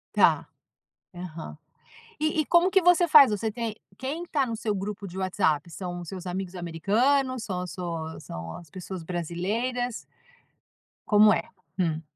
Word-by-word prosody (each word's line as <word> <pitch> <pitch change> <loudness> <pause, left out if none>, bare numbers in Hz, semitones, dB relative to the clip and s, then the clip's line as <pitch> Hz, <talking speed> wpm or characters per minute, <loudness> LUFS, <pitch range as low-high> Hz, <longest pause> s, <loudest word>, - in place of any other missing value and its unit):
Está, - - +4 0.7
aham. 165 - -7 0.6
E 310 0 +1
e 300 - -1
como 345 +2 +4
que 385 -1 +4
você 355 0 +5
faz? 295 -6 +8
Você 215 +1 -1
tem 225 -1 -4 0.2
quem 290 +7 -4
está 290 -5 +1
no 230 -2 -3
seu 215 -2 -1
grupo 200 +1 -4
de 180 +1 -9
WhatsApp? 180 -4 0
São 175 +2 -5
os 170 - -9
seus 185 -1 -7
amigos 185 0 -4
americanos, 230 - +1
são 180 -3 -3
as 180 - -5
suas 165 -3 -5
são 85 0 -7
as 170 -3 -12
pessoas 185 -2 -7
brasileiras? 210 +9 -2 1.1
Como 210 0 +6
é? - - -2 0.3
Hum. 165 -3 0
195 Hz, 160 wpm, -27 LUFS, 175-250 Hz, 1.1 s, faz